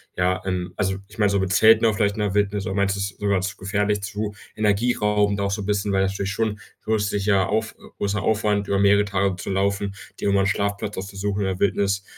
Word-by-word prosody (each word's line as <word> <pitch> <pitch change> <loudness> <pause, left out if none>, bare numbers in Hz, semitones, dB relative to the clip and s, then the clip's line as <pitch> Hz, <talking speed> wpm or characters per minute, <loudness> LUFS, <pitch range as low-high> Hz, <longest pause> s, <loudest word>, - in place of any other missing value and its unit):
ja, 90 +1 +1
ähm 90 -1 -3
also, 95 -1 -1
ich 105 - -16
meine, 105 -2 +3
so 100 - +2
mit 95 -1 -1
Zelten 110 +3 +6
auch 110 -2 +3
vielleicht 100 -1 +1
in - - -6
der 105 -2 0
Wildnis, 100 -1 0
oder 95 - -3
meinst 100 0 +1
du - - -5
es 100 0 -2
ist - - -27
sogar 100 -2 +1
zu 95 +1 -3
gefährlich, 100 +1 -1
zu 105 +1 -4 0.2
energieraubend 105 -1 +1
auch 100 - 0
so 100 +1 -2
bisschen, 100 0 0
weil 95 - +2
das 95 0 +1
natürlich 100 0 -3
schon 105 +1 -1 0.2
zusätzlicher 105 -2 +1
auf 110 +1 -1 0.2
großer 100 0 -1
Aufwand 105 0 +1
über 100 - +1
mehrere 100 +1 +4
Tage 100 -1 0
zu 95 - -6
laufen, 100 +1 0 0.2
dir - - 0
immer 100 0 +3
'n - - +1
Schlafplatz 100 +1 -1
auszusuchen 100 +1 -3
in 100 - 0
der 95 -1 -3
Wildnis, 100 0 +1
100 Hz, 230 wpm, -23 LUFS, 95-105 Hz, 0.2 s, Zelten